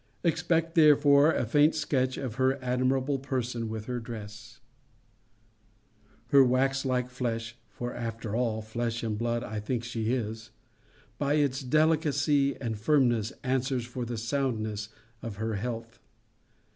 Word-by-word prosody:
Expect 165 -1 +1
therefore 150 -2 +6
a 125 - 0
faint 145 +7 +4
sketch 130 -4 0
of 130 -5 -4
her 130 +1 +3
admirable 130 +2 0
person 125 -4 -3
with 110 -1 -5
her 125 0 -3
dress. 110 -3 -9 1.7
Her 140 -1 +7
wax 135 +2 +2
like 125 -1 0
flesh 115 -2 -3
(for 120 0 -5
after 115 -2 -4
all, 115 -3 0
flesh 115 +1 -3
and 110 -2 -1
blood 120 +2 -1
I 110 -2 -4
think 115 +3 -2
she 115 -2 -2
is) 110 -2 -3 0.7
by 145 0 +1
its 140 -2 +1
delicacy 145 -1 +2
and 115 -4 -3
firmness, 120 -4 +2
answers 130 -1 0
for 120 +1 -5
the 120 0 -4
soundness 110 -4 -2 0.3
of 115 -3 -6
her 110 +2 -2
health. 115 +1 -5
125 Hz, 135 wpm, -28 LUFS, 115-135 Hz, 1.7 s, Her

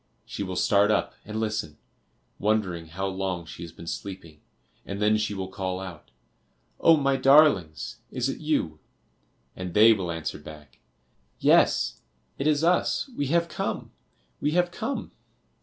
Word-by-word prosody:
She - - -6
will 95 -2 -3
start 100 +2 +3
up 105 - +1
and 110 +1 -4
listen, 105 -9 -2 0.6
wondering 95 -6 0
how 95 +5 -4
long 95 -2 -3
she 80 +1 -10
has 85 -1 -7
been 85 - -12
sleeping, 85 -4 -7 0.4
and 100 0 -6
then 105 +1 +3
she 105 -1 -1
will 95 -1 -4
call 95 -1 -4
out 90 -5 -9 0.7
"Oh, 165 -1 +6
my 140 -2 +2
darlings, 135 - +4
is 125 -1 -1
it 135 - -4
you?" 145 - -1 0.8
And 90 -2 -6
they 110 +2 +8
will 95 -5 -3
answer 80 -2 -4
back 75 -4 -13 0.6
"Yes, - - +3 0.4
it 140 - 0
is 155 0 +2
us, 180 +9 +1
we 145 - -1
have 170 +3 +2
come, - - -4 0.5
we 150 - 0
have 175 0 +2
come!" 275 +9 -4
100 Hz, 155 wpm, -26 LUFS, 85-135 Hz, 0.8 s, they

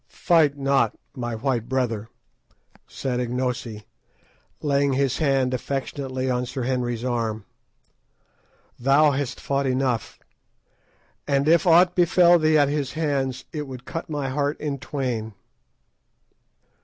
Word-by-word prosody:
"Fight 155 -5 +2
not, 140 0 +1 0.2
my 120 -2 -4
white 120 -1 -2
brother," 115 -5 -1 0.8
said 125 -2 -3
Ignosi, 125 -3 -3 0.7
laying 140 -1 +1
his 135 -1 0
hand 135 -4 +1
affectionately 130 0 -3
on 125 -1 -1
Sir 130 +1 -4
Henry's 120 -2 -2
arm; 115 -4 -2 1.3
"thou 140 +4 +4
hast 140 -2 -3
fought 140 0 -1
enough, 130 -4 -1 1.1
and 140 0 +1
if 170 +3 +4
aught 175 +1 +6
befell 175 0 +5
thee 155 0 +3
at 145 -1 +4
his 145 -2 -2
hands 140 -5 -1
it 150 -2 -4
would 130 -1 -9
cut 165 -1 -6
my 145 -3 -2
heart 145 +2 -1
in 145 -2 -3
twain." 120 -6 -3
135 Hz, 120 wpm, -24 LUFS, 125-145 Hz, 1.3 s, aught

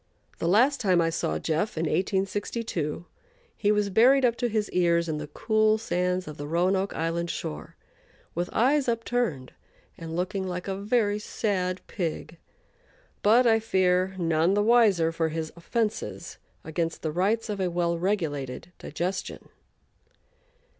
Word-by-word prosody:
The 165 - -1
last 250 +10 +4
time 185 -5 +3
I 165 -1 +2
saw - - -1
"Jeff," 165 +5 -1
in 160 - 0
1862, 190 -3 -2 0.5
he 205 - +1
was 210 -1 +1
buried 255 +6 +5
up 235 -1 +2
to 240 - 0
his 215 -1 0
ears 170 -1 +2
in 155 -2 -2
the 150 - -6
cool 215 +7 +2
sands 180 -3 -1
of 150 - -8
the 145 - -6
Roanoke 185 +4 +1
Island 165 +1 -1
shore, 75 - -5 0.6
with 175 +1 -2
eyes 270 +4 +2
upturned 230 - -1 0.5
and 165 -1 -6
looking 190 +2 -2
like 180 +1 -4
a 195 - -2
very 210 +1 +1
sad 185 -4 -2
pig, 165 -2 -4 0.8
but 230 +5 +5
I 225 -1 +5
fear 185 -3 +1
none 165 +1 +2
the 205 - +2
wiser 210 -8 +4
for 165 -1 -1
his 160 0 -4
offenses 215 +5 -3 0.2
against 165 +1 -3
the 155 - -1
rights 200 +8 0
of 205 -2 -4
a 185 -1 0
well 170 0 0
regulated 165 -6 -2
digestion. 185 +2 -4
185 Hz, 145 wpm, -27 LUFS, 165-215 Hz, 0.8 s, buried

